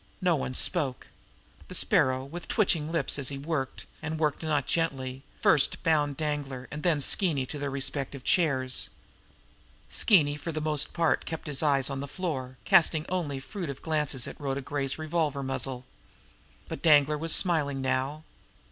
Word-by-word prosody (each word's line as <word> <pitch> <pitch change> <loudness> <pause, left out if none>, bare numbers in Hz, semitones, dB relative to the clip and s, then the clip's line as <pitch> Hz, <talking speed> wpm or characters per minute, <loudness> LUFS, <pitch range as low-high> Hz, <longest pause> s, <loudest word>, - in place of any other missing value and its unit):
No 180 -4 +2
one 130 -3 -3
spoke. 145 -7 +1 0.6
The - - -8
Sparrow, 130 0 +2
with 170 +5 -8
twitching 165 -7 +1
lips 165 -3 0
as 135 - 0
he 140 - -5
worked, 140 -2 -3 0.2
and 160 0 -3
worked 150 -2 0
not 150 -4 0
gently, 135 -5 -1
bound - - -30
first 150 -4 +4
Danglar 145 -4 -1
and 150 - -5
then 160 -4 +2
Skeeny 145 -3 +1
to 145 +3 -6
their 140 0 -2
respective 135 0 -3
chairs. 130 -8 +1 1.0
Skeeny 150 -8 +4
for 150 +3 -5
the 155 - -3
most 150 -1 0
part 165 -2 +1
kept 160 -1 -5
his 145 -3 -2
eyes 140 -3 +2
on 135 - -3
the 140 - -5
floor, 135 -7 -4
casting 165 -5 +4
only 165 -7 -2
furtive 150 -2 -6
glances 150 -5 0
at - - -9
Rhoda 140 -1 -2
Gray's 135 0 -1
revolver 155 -3 -1
muzzle. 130 -1 -3 0.8
But - - -6
Danglar 150 -2 +5
was 165 +1 -1
smiling 150 -7 +1
now. 135 +3 -1
145 Hz, 160 wpm, -28 LUFS, 135-160 Hz, 1.0 s, Danglar